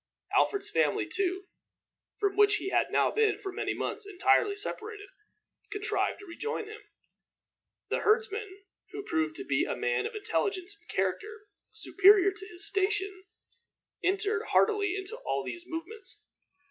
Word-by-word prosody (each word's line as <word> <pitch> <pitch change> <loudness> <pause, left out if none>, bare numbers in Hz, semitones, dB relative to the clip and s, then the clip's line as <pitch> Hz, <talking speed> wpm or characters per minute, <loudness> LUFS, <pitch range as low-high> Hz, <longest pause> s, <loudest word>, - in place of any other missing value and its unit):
Alfred's 405 - +2
family, - - +2
too, 380 0 -1 0.7
from 400 -2 0
which 415 0 +5
he 385 - -3
had - - +2
now - - +3
been 435 -1 +2
for 405 -2 -6
many - - -2
months 445 - -3
entirely 405 +1 +3
separated, 415 0 -6 0.6
contrived 415 +1 -1
to 410 - -12
rejoin 440 +5 -4
him. 430 +1 -10 1.1
The - - +1
herdsman, 425 -3 0 0.3
who 410 - -5
proved 325 -4 -1
to 390 - -6
be - - +2
a - - -2
man 480 -2 0
of 460 - -9
intelligence 405 -2 -1
and 410 - -30
character 430 0 -2 0.3
superior 395 -2 +5
to 385 0 -9
his 355 +2 -1
station, 390 -1 0 0.8
entered 415 +3 +1
heartily 410 -3 +3
into 395 +3 -5
all - - -2
these 345 0 -6
movements. 375 +5 -6
410 Hz, 145 wpm, -30 LUFS, 385-430 Hz, 1.1 s, which